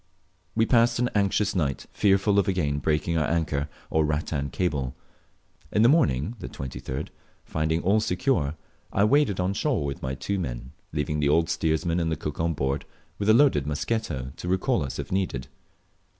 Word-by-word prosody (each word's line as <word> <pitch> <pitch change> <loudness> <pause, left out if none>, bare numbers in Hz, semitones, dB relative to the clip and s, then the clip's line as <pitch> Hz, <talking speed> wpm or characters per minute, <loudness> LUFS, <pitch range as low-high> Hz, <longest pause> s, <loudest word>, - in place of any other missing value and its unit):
We 110 0 +3
passed 115 0 +4
an 125 0 0
anxious 100 0 +1
night, 75 -7 -1
fearful 100 0 +3
of 100 - +1
again 75 -7 0
breaking 80 +2 0
our 75 - +1
anchor 75 -3 0 0.2
or 80 - +3
rattan 75 -1 -1
cable. 70 -5 -1 0.8
In 105 - +3
the 120 - +7
morning 115 - +2
(23d), 65 +2 -5 0.4
finding 80 +1 -1
all 100 +5 +4
secure, 90 - 0 0.4
I 100 - +2
waded 125 -4 +3
on 90 +2 +1
shore 110 - 0
with 70 -2 -4
my 65 +1 -3
two 95 +9 -2
men, 60 -6 -5 0.2
leaving 75 0 -1
the 70 -1 +2
old 80 +2 +3
steersman 80 +2 0
and 80 -1 0
the - - +1
cook 75 -1 -5
on 85 0 0
board, 70 +1 -1 0.3
with 100 +1 0
a - - +8
loaded 115 - +4
musketto 75 - -2
recall 95 +5 +1
us 70 - -5
if - - -5
needed. 90 -10 -1
80 Hz, 170 wpm, -26 LUFS, 70-100 Hz, 0.8 s, a